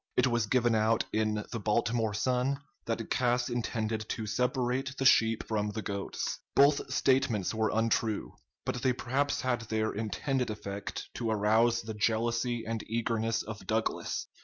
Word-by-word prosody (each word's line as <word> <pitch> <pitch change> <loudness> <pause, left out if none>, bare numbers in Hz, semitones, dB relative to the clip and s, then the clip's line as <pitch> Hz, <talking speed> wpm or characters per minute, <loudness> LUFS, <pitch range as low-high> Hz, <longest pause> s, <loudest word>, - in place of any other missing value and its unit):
It 125 - +5
was 120 -3 +1
given 120 0 +3
out 110 +1 +3
in 110 -1 0
the 115 - -3
"Baltimore 110 0 +1
Sun" 130 +4 +1 0.3
that 115 0 -2
Cass 125 -1 +2
intended 110 -2 -2
to 110 - -3
"separate 125 +4 0
the 135 - -1
sheep 115 -3 +5
from 105 -1 0
the 110 0 -4
goats." 100 -1 -3 0.2
Both 140 +1 +4
statements 130 -8 +2
were 110 -1 +1
untrue; 110 -1 0 0.3
but 125 - -2
they 130 -2 +3
perhaps 140 +4 0
had 125 -2 0
their 110 0 0
intended 125 +4 -1
effect, 100 -2 -5
to 115 -2 -2
arouse 110 +2 +3
the 110 0 -5
jealousy 115 +2 0
and 115 -1 -3
eagerness 115 0 0
of 110 -1 -8
Douglas. 110 0 -1
115 Hz, 155 wpm, -30 LUFS, 110-125 Hz, 0.3 s, It